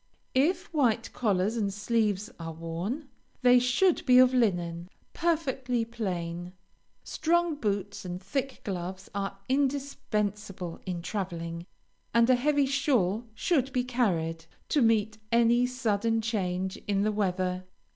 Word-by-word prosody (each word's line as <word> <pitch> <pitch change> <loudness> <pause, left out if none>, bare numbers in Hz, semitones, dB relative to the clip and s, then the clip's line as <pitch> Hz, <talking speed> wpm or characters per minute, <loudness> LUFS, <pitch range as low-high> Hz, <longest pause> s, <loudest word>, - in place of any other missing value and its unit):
If 345 +8 +1
white 240 -7 +1
collars 205 -1 +1
and 205 -4 0
sleeves 210 0 0
are 165 -1 -5
worn, 170 - -4 0.4
they 250 0 +7
should 250 +9 +2
be 250 -1 +7
of 255 0 +7
linen, 175 -7 0 0.2
perfectly 265 -8 0
plain. 180 -6 -4 0.5
Strong 340 -1 +1
boots 205 -4 -2
and 180 -1 -5
thick 260 +8 -3
gloves 185 0 -5
are 195 0 -3
indispensable 215 -9 -1
in 175 -2 -3
traveling, 170 -3 -4 0.5
and 235 0 +6
a - - +6
heavy 285 +3 +2
shawl 245 -6 +1
should 270 -4 +1
be 250 -1 +1
carried, 170 -10 0 0.2
to 295 - +3
meet 220 -2 +2
any 235 +1 +4
sudden 225 -2 0
change 190 -4 -2
in 200 -1 +1
the 215 - +2
weather. 185 -3 -1
215 Hz, 125 wpm, -29 LUFS, 185-255 Hz, 0.5 s, they